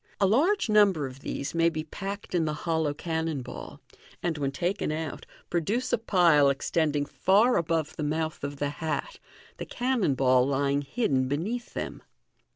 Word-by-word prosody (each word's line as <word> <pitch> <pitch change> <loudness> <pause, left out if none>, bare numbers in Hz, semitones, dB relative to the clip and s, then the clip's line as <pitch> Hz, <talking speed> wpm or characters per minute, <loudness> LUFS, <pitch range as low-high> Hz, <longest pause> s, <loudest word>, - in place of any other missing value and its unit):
A 200 - +4
large 300 - +3
number 205 -8 +4
of 130 0 -8
these 140 0 -4
may 165 0 +3
be 155 -2 -4
packed 195 +6 -6
in 170 -3 +2
the 155 -1 -1
hollow 160 -3 +1
cannon 160 -2 -3
ball, 125 - -9 0.4
and 170 -2 0
when 140 -2 -1
taken 175 +3 -1
out, 155 0 -5 0.2
produce 210 +10 0
a - - +3
pile 170 -9 +4
extending 145 +1 0
far 210 - +3
above 165 -2 0
the - - -3
mouth 155 +1 -2
of 140 0 -3
the 145 0 -1
hat, 160 - -4 0.4
the - - -5
cannon 245 - 0
ball 130 -1 +4
lying 140 0 +1
hidd, 220 - -2
n 130 -1 +2
beneath 200 - -3
them. - - -4
160 Hz, 170 wpm, -27 LUFS, 145-195 Hz, 0.4 s, A